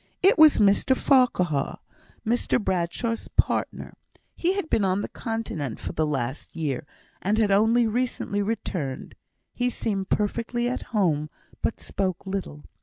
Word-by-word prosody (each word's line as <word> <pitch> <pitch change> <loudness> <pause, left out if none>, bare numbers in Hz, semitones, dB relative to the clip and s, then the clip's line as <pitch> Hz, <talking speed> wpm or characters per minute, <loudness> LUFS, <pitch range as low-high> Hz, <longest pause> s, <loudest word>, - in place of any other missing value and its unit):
It 385 - +6
was 310 -1 +8
Mr 210 +5 +4
Farquhar, 180 - +2 0.5
Mr 240 +2 +1
Bradshaw's 190 +4 -1
partner; - - 0 0.4
he 360 +3 +1
had 395 -5 -2
been 220 - +1
on 190 +1 +1
the - - -3
Continent 225 - -4
for - - -5
the 155 0 0
last 135 0 -3
year, 145 -4 -2 0.3
and 205 +3 +1
had 215 -3 +3
only 225 +4 +4
recently 225 -3 -1
returned. 180 -10 -3 0.4
He 245 0 0
seemed 200 -5 -2
perfectly 235 +3 0
at 250 - -2
home, 165 -10 +1 0.3
but - - -1
spoke 190 -1 -3
little. 190 -6 -4
205 Hz, 140 wpm, -25 LUFS, 170-235 Hz, 0.5 s, was